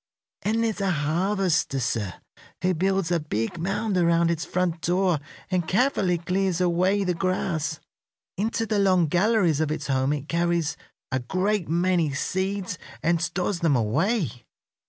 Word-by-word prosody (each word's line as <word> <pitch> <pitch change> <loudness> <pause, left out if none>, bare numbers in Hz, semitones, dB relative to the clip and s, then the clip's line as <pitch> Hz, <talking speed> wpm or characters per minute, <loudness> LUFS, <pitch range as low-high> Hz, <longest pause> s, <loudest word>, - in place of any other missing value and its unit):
"And 225 +2 +1
there's 220 -3 -1
a 195 - +1
harvester, 175 -1 +1
sir, 110 -7 -2 0.5
who 185 0 +3
builds 190 0 0
a 170 - +3
big 150 0 -3
mound 195 +3 -1
around 170 -1 +3
its 165 0 -2
front 180 -2 -1
door 180 -2 +2 0.3
and 180 -3 0
carefully 195 -5 +2
clears 185 +1 0
away 185 +3 +2
the 180 -2 0
grass. 170 -3 -1 0.6
Into 225 +3 -1
the 215 -2 0
long 185 -3 +4
galleries 180 -1 +2
of 155 - 0
its 155 -1 -3
home 135 0 +1
it 145 -1 -4
carries 170 -2 0 0.4
a 130 - +1
great 185 +8 -1
many 170 -3 +2
seeds, 190 +3 -2 0.2
and 165 +1 +2
stores 180 +1 -1
them 165 -5 +2
away. 135 - 0
175 Hz, 150 wpm, -25 LUFS, 160-195 Hz, 0.6 s, long